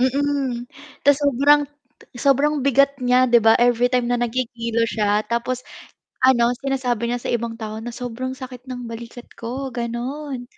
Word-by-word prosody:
Mm, 265 -2 0 0.4
tas 285 -1 +6
sobrang 285 +1 +4 0.6
sobrang 280 +4 +3
bigat 275 +1 +3
niya, 250 +1 +4
'di 240 0 +6
ba, 225 - +7
everytime 245 0 +2
na 245 - +2
nagkikilo 235 -1 -1
siya, 210 -1 +1
tapos 235 +2 -1 0.6
ano, 240 -2 +4
sinasabi 255 -4 -1
niya 240 0 -2
sa - - -2
ibang 230 -1 -2
tao 220 -1 -6
na, 235 +1 -7
"Sobrang 255 +1 -5
sakit 255 -1 -10
ng 245 -1 -6
balikat 235 +1 -9 0.2
ko", 255 +3 -5
gano'n. 245 +3 -4
245 Hz, 150 wpm, -21 LUFS, 235-265 Hz, 0.6 s, ba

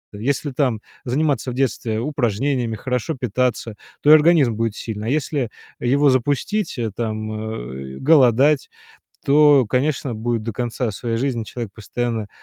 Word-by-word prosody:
Если 140 +6 -1
там 130 -4 0 0.3
заниматься 140 +1 0
в 120 - -6
детстве 120 -4 -1
упражнениями, 125 -2 -1
хорошо 125 +7 -2
питаться, 125 -2 -1 0.3
то 150 - +5
и - - +11
организм 155 -6 +5
будет 115 -1 -1
сильный. 110 -1 -5
А - - 0
если 140 -4 -1 0.3
его 140 +3 +3
запустить, 145 - 0
э, 115 -2 -2
там, 110 -1 -3
э, 65 - -6
голодать, 140 -1 +4 0.6
то, 145 -2 +6
конечно, 135 0 0
будет 115 +1 -2
до 115 - -3
конца 120 0 -2
своей 115 +3 -3
жизни 125 -3 -1
человек 115 -1 -6
постоянно 115 0 -3
125 Hz, 145 wpm, -21 LUFS, 110-140 Hz, 0.6 s, и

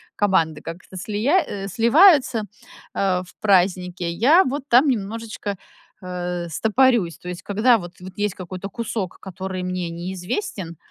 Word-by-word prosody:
команды 165 -7 +1
как-то 170 +3 -9
слия 220 - +1
э, 195 -1 -5
сливаются, 250 - +5 0.5
а, 185 -2 +1
в 180 - -16
празднике. 180 -3 +1
Я 285 - +5
вот 270 +2 -3
там 255 +5 +6
немножечко, 215 -3 -3 0.5
а, 180 -1 -4
стопорюсь. 220 - +2
То 180 - -8
есть 180 - -7
когда 225 +4 +3
вот 175 -4 -8
вот 185 0 -9
есть 205 -2 0
какой-то 185 +1 -7
кусок, 215 -4 -4
который 190 0 -5
мне 180 -1 -3
неизвестен, 180 - -5
195 Hz, 140 wpm, -22 LUFS, 180-230 Hz, 0.5 s, там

